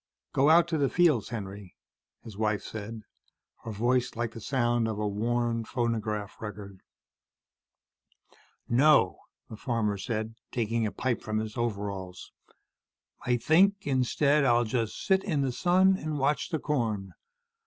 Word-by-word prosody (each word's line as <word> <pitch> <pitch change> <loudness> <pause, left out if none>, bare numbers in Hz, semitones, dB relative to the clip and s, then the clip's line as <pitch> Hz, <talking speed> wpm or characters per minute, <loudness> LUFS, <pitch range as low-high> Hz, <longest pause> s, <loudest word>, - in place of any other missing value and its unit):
"Go 140 +3 +4
out 170 +1 +6
to 160 -2 0
the 140 -2 +2
fields, 160 - +3
Henry," 100 -4 -7 0.5
his 110 - -10
wife 105 0 -1
said, 110 0 -7 0.6
her 115 - -4
voice 125 +4 0
like 115 -1 -2
the 115 - -10
sound 120 -1 +1
of 110 -2 -3
a 105 0 -1
worn 115 +3 -1
phonograph 110 -4 -3
record. 100 -3 -8 1.9
"No," 145 +5 +4 0.3
the 110 - -9
farmer 105 -3 -1
said, 110 +1 -3 0.2
taking 115 -1 0
a - - -4
pipe 125 -3 -2
from 110 0 -3
his 110 0 -3
overalls. 100 -6 -4 1.0
"I 125 0 +3
think 195 +10 +3
instead, 140 +2 +2
I'll 120 -2 +4
just 115 -1 -2
sit 190 0 +3
in 155 -8 0
the 135 -2 0
sun 185 +8 +3
and 155 -3 -4
watch 140 +2 0
the 160 - -1
corn. 110 - -2
120 Hz, 145 wpm, -28 LUFS, 105-140 Hz, 1.9 s, out